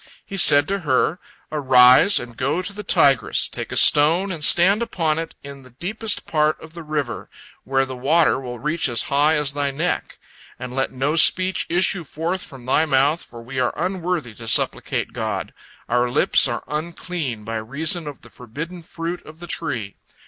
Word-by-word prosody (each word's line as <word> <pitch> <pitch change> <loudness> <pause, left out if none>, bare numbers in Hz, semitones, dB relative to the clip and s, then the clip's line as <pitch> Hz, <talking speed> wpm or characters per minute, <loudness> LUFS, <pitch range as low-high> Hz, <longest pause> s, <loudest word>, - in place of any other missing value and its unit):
He 195 - -8
said 145 -5 +6
to 200 +1 -2
her: 150 +2 0 0.3
"Arise, 130 +4 +5
and 120 -1 -10
go 140 +10 -2
to 200 - -5
the 210 - -7
Tigris, 140 - +3
take - - -7
a - - -3
stone 165 +6 +5
and 160 -4 -6
stand 190 +7 +5
upon 165 -9 -1
it 165 0 -6
in 140 -1 -10
the 130 - -17
deepest 205 - -1
part 155 -1 0
of 160 0 -13
the 170 - -9
river, 150 -5 -4 0.4
where 135 0 +1
the 130 -1 -8
water 145 +3 +2
will 125 -2 -7
reach 150 +3 -1
as 120 -2 +1
high 150 +3 +3
as 150 -2 -1
thy 145 -1 -1
neck. 155 +6 -3 0.4
And 125 0 -8
let 135 0 -1
no 135 +4 -2
speech 185 +3 +3
issue 175 +1 +1
forth 165 +5 -4
from 130 -3 -12
thy 130 +4 +2
mouth, 145 +3 +1
for 115 -1 -12
we 130 +2 -6
are 125 -1 -1
unworthy 175 - -3
to 115 +1 -11
supplicate - - 0
God, - - -4 0.3
our 125 +1 +1
lips 120 - +4
are - - -4
unclean 155 -6 -5
by 115 +1 -4
reason 150 +9 -2
of 145 - -9
the 120 - -17
forbidden 160 +9 -8
fruit 165 +2 -6
of 155 +1 -14
the 175 - -10
tree. 115 - -5
150 Hz, 185 wpm, -21 LUFS, 130-170 Hz, 0.4 s, said